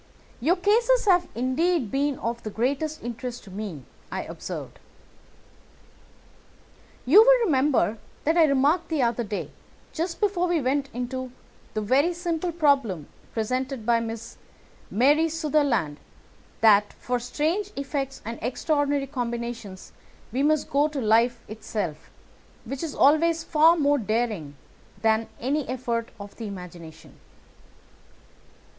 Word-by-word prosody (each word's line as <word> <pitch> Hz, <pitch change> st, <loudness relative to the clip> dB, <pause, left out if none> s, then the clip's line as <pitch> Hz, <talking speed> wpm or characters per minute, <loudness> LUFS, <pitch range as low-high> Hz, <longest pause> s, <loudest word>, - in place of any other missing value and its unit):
"Your 315 Hz, +9 st, +3 dB
cases 455 Hz, +6 st, +3 dB
have 360 Hz, -3 st, +4 dB
indeed 260 Hz, -, 0 dB
been 280 Hz, 0 st, 0 dB
of 235 Hz, +1 st, -3 dB
the 215 Hz, -, -5 dB
greatest 280 Hz, +8 st, -2 dB
interest 240 Hz, +1 st, -5 dB
to 195 Hz, -, -13 dB
me," 190 Hz, -8 st, -6 dB, 0.3 s
I -, -, -3 dB
observed. -, -, -7 dB, 2.3 s
"You 335 Hz, -, +8 dB
will -, -, +6 dB
remember 260 Hz, -, +2 dB, 0.2 s
that 320 Hz, +3 st, +2 dB
I 335 Hz, -2 st, +6 dB
remarked 290 Hz, +4 st, +2 dB
the 310 Hz, -5 st, +1 dB
other 235 Hz, 0 st, 0 dB
day, 210 Hz, -2 st, -5 dB, 0.4 s
just 335 Hz, +1 st, -3 dB
before 390 Hz, -4 st, +1 dB
we 345 Hz, -2 st, +1 dB
went 275 Hz, +1 st, 0 dB
into 250 Hz, +1 st, -4 dB, 0.4 s
the 215 Hz, -, 0 dB
very 275 Hz, +11 st, +2 dB
simple 345 Hz, 0 st, -2 dB
problem 275 Hz, -, +1 dB, 0.2 s
presented 255 Hz, +2 st, -2 dB
by 235 Hz, 0 st, +3 dB
Miss 230 Hz, 0 st, -6 dB, 0.5 s
Mary 290 Hz, +8 st, +3 dB
Sutherland, 285 Hz, -, 0 dB, 0.6 s
that 210 Hz, -2 st, +5 dB
for 245 Hz, 0 st, -2 dB
strange 320 Hz, -, -1 dB
effects 275 Hz, -1 st, -4 dB
and 230 Hz, +1 st, -5 dB
extraordinary 285 Hz, +3 st, 0 dB
combinations 235 Hz, -6 st, -5 dB, 0.4 s
we 255 Hz, +4 st, -1 dB
must 310 Hz, +1 st, +1 dB
go 290 Hz, +2 st, +3 dB
to 295 Hz, -2 st, -4 dB
life 230 Hz, +1 st, +3 dB
itself, 205 Hz, -7 st, -5 dB, 0.6 s
which 265 Hz, +3 st, -5 dB
is 325 Hz, -3 st, -4 dB
always 330 Hz, +3 st, +4 dB
far 320 Hz, +2 st, +5 dB
more 290 Hz, -2 st, +3 dB
daring 215 Hz, -9 st, -2 dB, 0.5 s
than 220 Hz, 0 st, +2 dB
any 275 Hz, +3 st, -1 dB
effort 235 Hz, -2 st, -2 dB
of 200 Hz, 0 st, -10 dB
the 225 Hz, -, -5 dB
imagination." 180 Hz, -4 st, -10 dB
260 Hz, 125 wpm, -25 LUFS, 225-310 Hz, 2.3 s, You